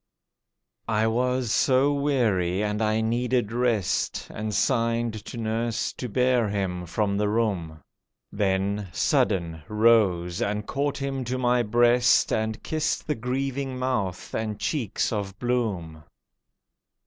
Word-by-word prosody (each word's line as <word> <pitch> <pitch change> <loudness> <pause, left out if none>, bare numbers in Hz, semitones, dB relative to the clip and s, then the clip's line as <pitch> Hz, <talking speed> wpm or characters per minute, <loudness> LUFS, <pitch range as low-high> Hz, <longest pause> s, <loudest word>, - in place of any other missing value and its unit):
I 110 0 +2
was 125 +1 0
so 135 +4 +3
weary 110 -10 +1
and 105 +1 -1
I 110 0 +1
needed 120 0 0
rest, 115 -5 0
And 110 0 -4
signed 115 -1 +1
to - - -7
nurse 115 0 -1
to 125 - -6
bear 125 -1 +2
him 90 -3 -2
from 100 +2 0
the 105 0 +1
room. 95 -8 -1 0.5
Then, 100 0 0
sudden, 80 +2 +1
rose 105 -6 +3
and 105 +1 -1
caught 140 +1 -1
him 135 -1 -3
to 125 +2 -2
my 125 -1 +2
breast, 120 +2 +3
And 110 0 -2
kissed 155 -1 -1
the 150 - 0
grieving 135 +1 -3
mouth 120 -8 -2
and 110 -2 -3
cheeks 120 - -1
of 100 -2 -4
bloom. 100 -11 -2
110 Hz, 125 wpm, -25 LUFS, 100-125 Hz, 0.5 s, so